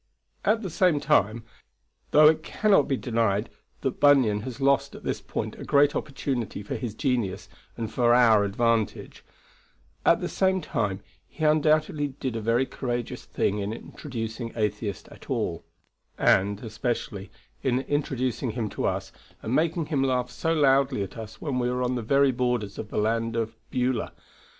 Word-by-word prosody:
At 220 Hz, +2 st, +2 dB
the 190 Hz, -, -4 dB
same 170 Hz, -3 st, +3 dB
time, 120 Hz, -7 st, +2 dB, 0.7 s
though 150 Hz, 0 st, +7 dB
it 155 Hz, 0 st, +4 dB
cannot 195 Hz, -2 st, +2 dB
be 135 Hz, -, 0 dB
denied 115 Hz, -3 st, 0 dB, 0.3 s
that -, -, -2 dB
Bunyan 130 Hz, -8 st, +5 dB
has 130 Hz, +2 st, -7 dB
lost 140 Hz, 0 st, +2 dB
at -, -, -11 dB
this -, -, -2 dB
point -, -, -4 dB
a -, -, -6 dB
great 145 Hz, 0 st, +3 dB
opportunity 130 Hz, -7 st, -3 dB
for -, -, -5 dB
his 115 Hz, -4 st, -4 dB
genius 120 Hz, -8 st, -1 dB, 0.3 s
and 115 Hz, -1 st, -4 dB
for 120 Hz, 0 st, +3 dB
our 115 Hz, -4 st, +6 dB
advantage, 115 Hz, +2 st, -1 dB, 0.8 s
at -, -, +4 dB
the -, -, -2 dB
same 190 Hz, 0 st, +1 dB
time, 100 Hz, -, -2 dB, 0.3 s
he 160 Hz, -, -8 dB
undoubtedly 155 Hz, -1 st, +2 dB
did 130 Hz, -3 st, -3 dB
a 115 Hz, -, -2 dB
very 115 Hz, +4 st, +2 dB
courageous 120 Hz, -3 st, -4 dB
thing 105 Hz, +1 st, -1 dB
in 100 Hz, +1 st, -2 dB
introducing 115 Hz, -1 st, -6 dB
Atheist 105 Hz, -2 st, -2 dB
at -, -, -15 dB
all; -, -, -2 dB, 0.5 s
and, 100 Hz, +3 st, +2 dB
especially, 110 Hz, -3 st, -3 dB, 0.3 s
in 130 Hz, 0 st, +1 dB
introducing 130 Hz, -3 st, -1 dB
him 115 Hz, -3 st, -2 dB
to -, -, -3 dB
us -, -, -3 dB, 0.3 s
and 110 Hz, -, -2 dB
making 165 Hz, +2 st, +1 dB
him 145 Hz, -3 st, 0 dB
laugh 125 Hz, -2 st, 0 dB
so 165 Hz, -, -1 dB
loudly 135 Hz, -6 st, +3 dB
at 95 Hz, 0 st, -8 dB
us 110 Hz, -2 st, -9 dB
when 135 Hz, -5 st, -2 dB
we 120 Hz, 0 st, 0 dB
are 125 Hz, 0 st, -1 dB
on 125 Hz, 0 st, 0 dB
the 125 Hz, -, -2 dB
very 140 Hz, +4 st, +3 dB
borders 125 Hz, -5 st, -1 dB
of 105 Hz, -, -6 dB
the -, -, -5 dB
land 115 Hz, +2 st, 0 dB
of 115 Hz, -1 st, -1 dB, 0.2 s
Beulah. 125 Hz, -1 st, -1 dB
125 Hz, 170 wpm, -26 LUFS, 110-140 Hz, 0.8 s, though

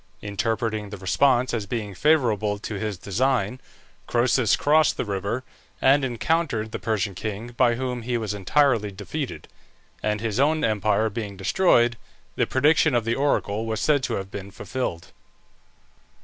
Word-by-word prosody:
Interpreting 110 Hz, +1 st, -2 dB
the 105 Hz, -, -7 dB
response 125 Hz, +7 st, +2 dB
as 110 Hz, -4 st, -2 dB
being 105 Hz, -2 st, -4 dB
favourable 110 Hz, -, +2 dB
to 105 Hz, -, -6 dB
his 105 Hz, -2 st, -3 dB
design, 125 Hz, +3 st, 0 dB, 0.5 s
Croesus 120 Hz, -1 st, +3 dB
crossed 155 Hz, 0 st, +3 dB
the -, -, -1 dB
river, 100 Hz, +5 st, -2 dB, 0.4 s
and 135 Hz, +1 st, +4 dB
encountered 120 Hz, -2 st, -1 dB
the -, -, -4 dB
Persian 105 Hz, -3 st, -1 dB
king, 110 Hz, +4 st, -5 dB
by 120 Hz, 0 st, +2 dB
whom 125 Hz, -1 st, -3 dB
he 120 Hz, +1 st, -1 dB
was 110 Hz, -3 st, -3 dB
entirely 110 Hz, +2 st, +2 dB
defeated; 95 Hz, -, -6 dB, 0.5 s
and 105 Hz, 0 st, 0 dB
his 115 Hz, +1 st, -2 dB
own 155 Hz, +3 st, +2 dB
empire 110 Hz, 0 st, +2 dB
being 100 Hz, -2 st, -5 dB
destroyed, 120 Hz, -, +3 dB, 0.4 s
the -, -, +1 dB
prediction 150 Hz, +1 st, +3 dB
of 120 Hz, -2 st, +1 dB
the 115 Hz, -, +1 dB
oracle 115 Hz, -5 st, 0 dB
was 110 Hz, -1 st, -2 dB
said 145 Hz, -3 st, +2 dB
to 125 Hz, -2 st, -2 dB
have 95 Hz, 0 st, -5 dB
been 100 Hz, 0 st, -7 dB
fulfilled. 100 Hz, -5 st, -5 dB
115 Hz, 150 wpm, -24 LUFS, 105-130 Hz, 0.5 s, and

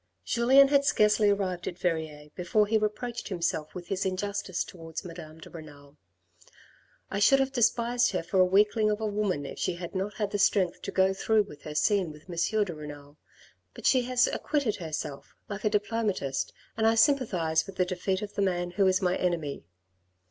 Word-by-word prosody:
Julien 265 Hz, -, +5 dB
had 280 Hz, 0 st, +4 dB
scarcely 210 Hz, -5 st, +3 dB
arrived 190 Hz, -3 st, -1 dB
at 175 Hz, -, -4 dB
Verrieres 160 Hz, -4 st, -3 dB
before 200 Hz, +4 st, +1 dB
he 215 Hz, +2 st, -1 dB
reproached 220 Hz, +3 st, -2 dB
himself 170 Hz, -4 st, -2 dB
with 175 Hz, -1 st, -8 dB
his 195 Hz, -1 st, -1 dB
injustice 190 Hz, -1 st, -2 dB
towards 165 Hz, 0 st, -8 dB
Madame 165 Hz, -2 st, -9 dB
de 160 Hz, -, -12 dB
Renal. 145 Hz, -3 st, -12 dB, 0.6 s
" -, -, -29 dB
I 200 Hz, -, -1 dB
should 270 Hz, +7 st, +5 dB
have 270 Hz, 0 st, +1 dB
despised 240 Hz, 0 st, +2 dB
her 180 Hz, -3 st, -2 dB
for 190 Hz, +3 st, 0 dB
a -, -, +8 dB
weakling 210 Hz, +3 st, +3 dB
of 210 Hz, 0 st, -1 dB
a 220 Hz, -, -2 dB
woman 205 Hz, -8 st, -1 dB
if -, -, -8 dB
she 180 Hz, -, -1 dB
had 175 Hz, -1 st, -7 dB
not 195 Hz, +1 st, -3 dB
had 210 Hz, -2 st, -2 dB
the 205 Hz, -, -2 dB
strength 190 Hz, -3 st, +2 dB
to -, -, -5 dB
go 190 Hz, 0 st, +3 dB
through 215 Hz, +2 st, +2 dB
with 150 Hz, -8 st, -13 dB
her 150 Hz, -1 st, -6 dB
scene 185 Hz, +2 st, +2 dB
with 150 Hz, +2 st, -15 dB
M. 185 Hz, +5 st, 0 dB
de 185 Hz, -4 st, -5 dB
Renal. 145 Hz, -1 st, -10 dB, 0.6 s
But -, -, -10 dB
she 255 Hz, -, +5 dB
has 250 Hz, 0 st, +3 dB
acquitted 280 Hz, -8 st, -1 dB
herself 155 Hz, -5 st, -6 dB
like 205 Hz, +1 st, -6 dB
a -, -, +4 dB
diplomatist 210 Hz, -, -1 dB, 0.2 s
and 220 Hz, 0 st, +2 dB
I 225 Hz, -, +4 dB
sympathise 210 Hz, -, +2 dB
with 195 Hz, -, -9 dB
the 185 Hz, -, +1 dB
defeat 185 Hz, +2 st, -2 dB
of 205 Hz, -, -7 dB
the -, -, -2 dB
man 175 Hz, -2 st, 0 dB
who 195 Hz, +2 st, +2 dB
is 185 Hz, +1 st, +2 dB
my 180 Hz, 0 st, +2 dB
enemy. 165 Hz, -, -2 dB
190 Hz, 200 wpm, -28 LUFS, 170-215 Hz, 0.6 s, a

